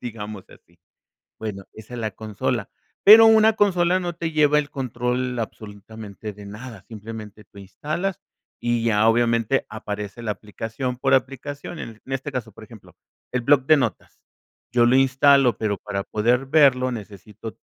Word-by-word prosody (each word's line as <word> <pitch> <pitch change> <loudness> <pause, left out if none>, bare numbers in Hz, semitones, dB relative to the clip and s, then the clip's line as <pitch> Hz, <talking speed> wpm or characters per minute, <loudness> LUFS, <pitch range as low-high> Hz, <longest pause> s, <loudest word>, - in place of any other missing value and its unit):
digamos 105 -4 -7
así. 85 0 -21 0.6
Bueno, 100 -3 -6
esa 110 +3 -11
es 120 - -5
la 110 -1 -2
consola. 110 +3 -3 0.3
Pero 220 +2 +10
una 220 0 +6
consola 185 -4 +2
no 175 -1 -4
te 165 -1 -3
lleva 150 -1 +4
el 145 -1 -2
control 125 -1 -2
absolutamente 105 -1 -8
de 100 0 -12
nada, 105 0 -10
simplemente 110 -1 -9
tú 100 - -18
instalas, 155 - -4 0.4
y 120 -1 0
ya 110 -1 +3
obviamente 115 +2 +2
aparece 105 +1 -6
la 110 -2 -1
aplicación 115 +5 -5
por - - +2
aplicación. 140 +5 -3
En 110 -2 -8
este 135 +2 -4
caso, 125 -3 -5
por - - -13
ejemplo, - - -16 0.4
el 125 - 0
bloc 140 +1 +4
de 155 - +6
notas. 125 -5 -4 0.5
Yo 120 -1 +4
lo 125 +2 +4
instalo, 135 -1 +4
pero 105 -2 -1
para 100 -2 -4
poder 120 +5 +1
verlo 135 -3 +4
necesito 105 0 -9
120 Hz, 155 wpm, -23 LUFS, 105-135 Hz, 0.6 s, Pero